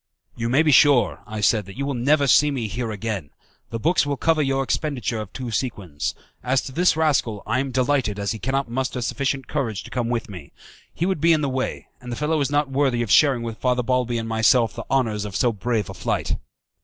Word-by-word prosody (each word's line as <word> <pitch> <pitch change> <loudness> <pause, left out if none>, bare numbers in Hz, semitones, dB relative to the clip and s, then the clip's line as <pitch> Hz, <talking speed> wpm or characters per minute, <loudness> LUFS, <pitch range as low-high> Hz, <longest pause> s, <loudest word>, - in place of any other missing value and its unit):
"You 115 -1 -2
may 140 +6 +4
be 155 - +3
sure," 140 -2 +5
I 105 0 -5
said, 105 -1 +2
"that 100 - -11
you 140 - -2
will 140 - -2
never 140 +4 +2
see 150 +2 +5
me 130 -6 -2
here 120 +2 -3
again. 105 -7 -4 0.4
The 115 - -3
books 170 +9 +2
will 145 -1 -2
cover 160 +1 +2
your 135 -1 +1
expenditure 130 -6 -2
of 105 -3 -8
two 125 -3 -6
sequins. 100 - -3 0.3
As 130 +1 +2
to - - -7
this 175 +2 +2
rascal, 135 -10 +1
I 130 - 0
am 135 +1 -1
delighted, 130 -4 0
as 100 -1 -2
he 110 - -5
cannot 135 +5 -1
muster 130 +2 -2
sufficient 135 +1 -2
courage 115 -10 -2
to - - -12
come 120 -2 -1
with 120 -2 -2
me. 90 -8 -10 0.4
He 170 - -2
would 185 -5 -1
be 165 +1 +5
in 155 - +1
the 140 - 0
way, 130 0 -3
and 125 -1 -8
the - - -2
fellow 150 +3 0
is 140 - 0
not 145 0 +1
worthy 135 -3 +1
of 110 - -4
sharing 135 -6 +5
with 115 -1 -6
Father 125 -1 +1
Balbi 125 -1 0
and 115 0 -3
myself 115 +1 +3
the - - -7
honours 115 -6 +1
of 105 -2 -6
so 120 0 +2
brave 110 0 -1
a - - -7
flight." - - -2
125 Hz, 235 wpm, -23 LUFS, 115-140 Hz, 0.4 s, sure